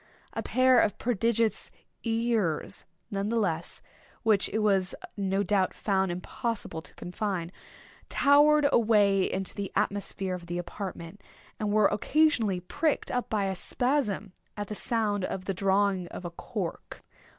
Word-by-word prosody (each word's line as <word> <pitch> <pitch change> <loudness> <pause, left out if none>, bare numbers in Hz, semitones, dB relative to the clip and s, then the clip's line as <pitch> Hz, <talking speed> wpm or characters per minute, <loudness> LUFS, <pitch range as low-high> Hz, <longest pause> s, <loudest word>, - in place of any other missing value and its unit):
A - - -2
pair 255 -1 +4
of 205 - +2
prodigious 230 -1 0 0.3
ears, 225 -8 -1 0.3
nevertheless, 200 -4 -1 0.4
which 215 -3 +3
it 215 - -2
was 195 -3 +2 0.2
no 195 0 0
doubt 195 -1 +1
found 190 -3 +1
impossible 200 0 -4
to - - -12
confine, 180 -2 -3 0.6
towered 295 +1 +5
away 205 -4 +4
into 190 0 -3
the 200 -1 -4
atmosphere 195 -1 -1
of 175 -1 -6
the 175 0 -3
apartment, 180 +1 -6 0.4
and 210 -1 -1
were 215 0 +4
occasionally 220 - +2
pricked 300 - -1
up 250 -1 -2
in 215 -2 +1
a 195 -1 -1
spasm, 215 -3 -1 0.2
at 205 0 -4
the - - -3
sound 210 -3 -1
of 185 0 -3
the 195 - -1
drawing 195 -1 +1
of 180 - -8
a 175 - -4
cork. 185 0 -6
205 Hz, 140 wpm, -28 LUFS, 190-230 Hz, 0.6 s, towered